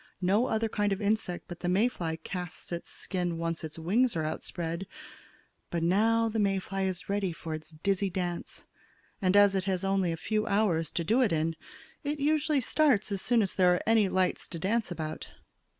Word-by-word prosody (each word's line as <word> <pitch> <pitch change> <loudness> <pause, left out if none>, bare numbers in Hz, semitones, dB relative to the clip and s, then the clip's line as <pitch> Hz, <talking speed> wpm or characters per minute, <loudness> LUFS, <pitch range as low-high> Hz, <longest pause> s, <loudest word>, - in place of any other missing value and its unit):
No 205 +7 +3
other 225 0 +1
kind 205 -1 0
of 195 - 0
insect 205 -4 -1
but 175 -1 -8
the 175 - -2
May 200 +6 +4
fly 170 -9 -3
casts 180 +2 -7
its 170 0 -5
skin 175 -3 -3
once 165 0 -3
its 155 0 -6
wings 215 +9 +2
are 160 - 0
outspread. 170 +3 -4 0.8
But 170 -1 -1
now 225 +6 +3
the 225 0 -1
May 195 -2 +2
fly 195 +1 -2
is 185 -1 -3
ready 200 -2 0
for 165 -1 -6
its 155 0 -7
dizzy 195 +5 0
dance. 175 -2 -4 0.6
And 190 +1 +3
as 205 -1 +7
it 190 -1 0
has 190 -1 -1
only 195 -2 +1
a 165 - -3
few 215 +5 -1
hours 190 -7 +2
to 170 - 0
do 225 +10 +3
it 240 - +3
in, 160 0 0 0.5
it 295 +1 -2
usually 300 0 +2
starts 250 -6 +2
as 195 -1 -1
soon 235 -2 +3
as 195 - -2
there 180 -1 +4
are - - -3
any 220 -3 +4
lights 185 -1 0
to 170 - -7
dance 210 +7 0
about. 155 -3 -5
190 Hz, 200 wpm, -29 LUFS, 170-215 Hz, 0.8 s, as